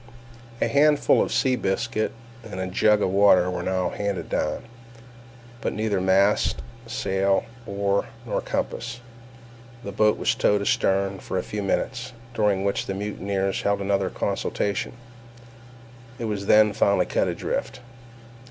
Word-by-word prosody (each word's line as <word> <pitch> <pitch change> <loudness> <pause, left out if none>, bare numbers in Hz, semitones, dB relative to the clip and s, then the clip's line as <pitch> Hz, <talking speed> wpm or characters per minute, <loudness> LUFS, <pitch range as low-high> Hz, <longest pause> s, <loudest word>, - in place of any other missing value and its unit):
A - - +2
handful 150 +1 +4
of - - -1
sea 130 -1 +2
biscuit 110 +1 -1 0.3
and 105 -4 -7
a 95 - -1
jug 105 +3 +3
of 95 - +1
water 95 -2 +5
were 90 - -3
now 95 -1 0
handed 100 -2 -3
down; 75 - -1 1.0
but - - -2
neither 105 -3 -1
mast, 95 +2 +2 0.2
sail, 100 -5 0 0.2
oar, 100 0 0 0.2
nor - - -1
compass. 120 +1 -3 0.8
The 100 - -5
boat 105 +2 +3
was - - +1
towed 105 0 +2
astern 95 -1 +1
for - - -4
a - - -1
few 105 - -4
minutes, 120 +5 -2 0.2
during 105 -4 +1
which 100 0 -1
the 95 - -3
mutineers 100 -1 -2
held 100 0 +1
another 100 -1 0
consultation—it 100 +4 -2 1.3
was 100 -2 -3
then 105 -1 +6
finally 100 0 +3
cut - - 0
adrift. 135 - -3
100 Hz, 135 wpm, -24 LUFS, 95-105 Hz, 1.3 s, then